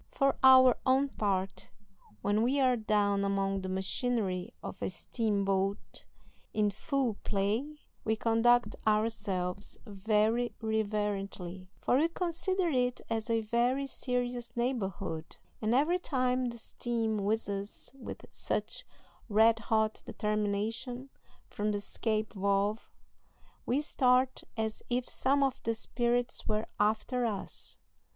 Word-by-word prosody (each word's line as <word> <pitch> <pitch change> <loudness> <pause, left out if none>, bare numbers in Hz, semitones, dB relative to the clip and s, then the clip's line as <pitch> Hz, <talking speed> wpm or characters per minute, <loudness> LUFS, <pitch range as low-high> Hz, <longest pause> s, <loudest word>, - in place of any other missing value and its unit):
For 275 -1 +2
our 260 -1 +8
own 265 +2 +3
part, 195 -5 -2 0.5
when 205 +2 +2
we 260 +5 +2
are 255 -2 +4
down 205 -3 +1
among 195 0 0
the 190 - -4
machinery 190 0 -1
of - - -7
a - - -1
steamboat 200 -3 -1 0.5
in 210 -1 +3
full 250 +1 -1
play, 220 +10 -1 0.3
we 220 - +1
conduct 230 +2 +3
ourselves 205 -4 -1
very 220 +3 +1
reverently, 200 -4 -2
for 255 - +2
we 320 - +4
consider 355 +2 -1
it 250 -3 +1
as 225 0 -1
a 225 -1 +2
very 240 +5 +1
serious 245 -2 -3
neighborhood, 195 -9 -2 0.3
and 220 +2 +2
every 325 +7 +3
time 255 -5 0
the 235 -1 -4
steam 225 -2 -2
whizzes 200 -1 -3
with 270 -2 -8
such - - -2 0.5
red 220 +2 +5
hot 220 -1 0
determination 215 +5 -2 0.3
from 210 0 -2
the - - 0
escape 215 +1 -2
valve, 200 +2 0 0.8
we 265 +5 +2
start 255 -3 +2
as 220 -1 -2
if 245 0 0
some 275 +2 +2
of 270 -2 0
the 230 0 -1
spirits 240 +2 -1
were 215 0 0
after 220 +4 +1
us. 215 -4 -3
225 Hz, 120 wpm, -31 LUFS, 205-250 Hz, 0.8 s, our